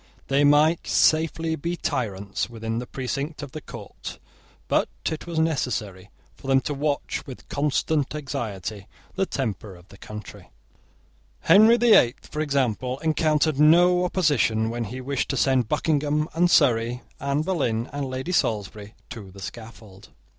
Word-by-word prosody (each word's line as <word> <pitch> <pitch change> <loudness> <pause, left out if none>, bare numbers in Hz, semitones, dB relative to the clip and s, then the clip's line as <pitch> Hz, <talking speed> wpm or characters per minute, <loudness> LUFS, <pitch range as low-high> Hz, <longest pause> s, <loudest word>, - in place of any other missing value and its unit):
They 140 +1 +3
might 150 +3 +4
safely 160 0 +2
be 170 +4 -3
tyrants, 105 - -3
within 115 -1 -4
the 125 - -6
precinct 140 +5 -4
of 140 - -8
the 155 - -7
court: - - -9 0.5
but - - +1 0.2
it 160 +2 -6
was 170 -2 -5
necessary 110 - -1 0.3
for - - -12
them 135 0 +4
to 145 - -3
watch 145 0 -2
with 130 - -10
constant 145 0 0
anxiety 110 -8 -5 0.3
the 195 0 -1
temper 105 -6 -4
of 90 +1 -18
the 100 - -16
country. 105 -2 -10 0.9
Henry 220 +4 +6
the 240 -1 +5
Eighth, 120 +2 +4
for 150 - -4
example, 130 -4 -1
encountered 155 -2 +1
no 175 +4 +5
opposition 140 -11 +1
when 120 0 -3
he 125 +5 -7
wished 140 +2 -2
to 135 - -1
send 130 -2 +2
Buckingham 150 0 0
and 175 +2 +3
Surrey, 125 -5 +3 0.2
Anne 140 +2 -1
Boleyn 135 -10 -1
and 140 -1 -3
Lady 130 +7 -4
Salisbury, 105 - -2 0.2
to 105 -5 -8
the 100 +1 -13
scaffold. 105 -2 -10
135 Hz, 150 wpm, -24 LUFS, 115-155 Hz, 0.9 s, Henry